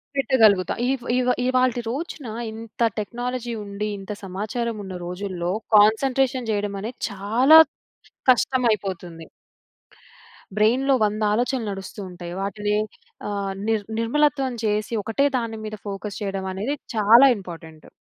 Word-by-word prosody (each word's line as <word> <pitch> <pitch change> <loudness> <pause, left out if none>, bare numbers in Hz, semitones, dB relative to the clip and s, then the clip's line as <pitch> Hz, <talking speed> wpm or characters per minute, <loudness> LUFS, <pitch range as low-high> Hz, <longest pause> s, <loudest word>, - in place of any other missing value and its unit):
పెట్టగలుగుతా. 220 -9 +3
ఇవ్ 265 -2 -1
ఇవ్ 250 0 +2
ఇవాల్టి 255 -1 +2
రోజున 290 -1 -5 0.2
ఇంత 225 +1 -10 0.2
టెక్నాలజీ 240 +2 -4
ఉండి, 205 +1 -4
ఇంత 195 +2 -8
సమాచారం 215 +5 -3
ఉన్న 190 -1 -7
రోజుల్లో 180 -1 -3 0.2
కాన్సంట్రేషన్ 250 +4 +3
జేయడం 205 -1 -2
అనేది 230 +4 -6
చాలా 230 +10 +6 0.7
కష్టమైపోతుంది. 195 -10 -1 1.3
బ్రెయిన్‌లో 245 +6 +3
100 210 +1 -2
ఆలోచనలు 240 0 0
నడుస్తూ 195 +2 -8
ఉంటాయి. 175 -1 -8
వాటిని 205 +1 -1 0.5
అహ్, 200 -1 -2
నిర్ 220 -2 0
నిర్మలత్వం 270 +3 +1
చేసి 210 +1 -1
ఒకటే 250 +7 +1
దాని 230 -2 -3
మీద 215 0 -5
ఫోకస్ 200 +1 -5
చేయడం 195 -1 -3
అనేది 210 +9 -2 0.2
చాలా 225 +5 +7
ఇంపార్టెంట్. 165 -5 -11
215 Hz, 115 wpm, -23 LUFS, 200-250 Hz, 1.3 s, చాలా